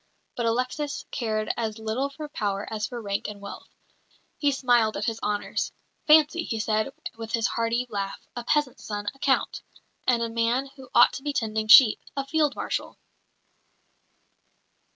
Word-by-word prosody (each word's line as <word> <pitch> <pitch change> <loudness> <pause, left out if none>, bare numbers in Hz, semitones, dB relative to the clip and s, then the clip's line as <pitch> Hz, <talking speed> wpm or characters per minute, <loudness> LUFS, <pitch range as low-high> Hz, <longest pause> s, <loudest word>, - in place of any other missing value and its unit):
But 235 -1 -1
Alexis 255 +5 -2
cared 215 -4 -1
as 220 -2 -3
little 220 +5 -2
for 300 +2 -7
power 205 -8 -3
as 210 -1 -2
for 245 - -6
rank 200 -3 -3
and 210 -1 -7
wealth. 200 0 -9 0.7
He 290 -1 +3
smiled 245 -5 +2
at 205 - -2
his 225 -1 -2
honours. 205 0 -2 0.4
"Fancy," 310 +2 +6
he 225 -8 -3
said, 215 +3 0 0.3
with 225 -1 -7
his 230 -1 +1
hearty 235 +1 0
laugh, 200 -3 -5
"a 240 - -4
peasant's 295 0 0
son, 205 -1 -5
a 275 - -22
Count; 265 -1 +1 0.5
and 240 -2 +3
a - - 0
man 235 +4 0
who 265 -3 -13
ought 240 - +7
to - - -6
be 290 -1 -2
tending 220 -3 -1
sheep, 220 0 +9 0.2
a 275 - -1
Field 295 0 +1
Marshal!" - - -3
235 Hz, 165 wpm, -26 LUFS, 215-270 Hz, 0.7 s, sheep